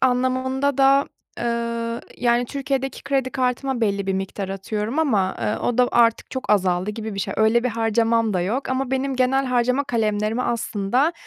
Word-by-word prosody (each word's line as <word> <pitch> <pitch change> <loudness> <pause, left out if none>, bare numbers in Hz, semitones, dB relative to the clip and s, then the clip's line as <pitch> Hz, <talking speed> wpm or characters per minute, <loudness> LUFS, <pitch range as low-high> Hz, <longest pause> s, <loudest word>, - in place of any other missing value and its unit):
anlamında 260 +2 +1
da, 275 +1 +5 0.3
eee, 235 0 -2 0.2
yani, 240 0 +2
Türkiye'deki 270 0 -3
kredi 270 -2 0
kartıma 255 0 -1
belli 200 -3 0
bir 195 - +1
miktar 195 +1 -4
atıyorum 210 +6 -3
ama, 210 -12 +1
eee, 105 -2 0
o 245 0 -1
da 250 -1 +5
artık 230 -1 +3
çok 260 -4 -4
azaldı 185 -1 +2
gibi 220 0 -6
bir 195 - -3
şey. - - -3
Öyle 220 +2 +3
bir - - +2
harcamam 225 0 +1
da 180 - +1
yok 220 +10 -2
ama 260 0 -1
benim 265 0 -1
genel 260 +2 +2
harcama 250 +2 +1
kalemlerimi 220 -2 0
aslında, 235 - 0
235 Hz, 170 wpm, -22 LUFS, 215-260 Hz, 0.3 s, da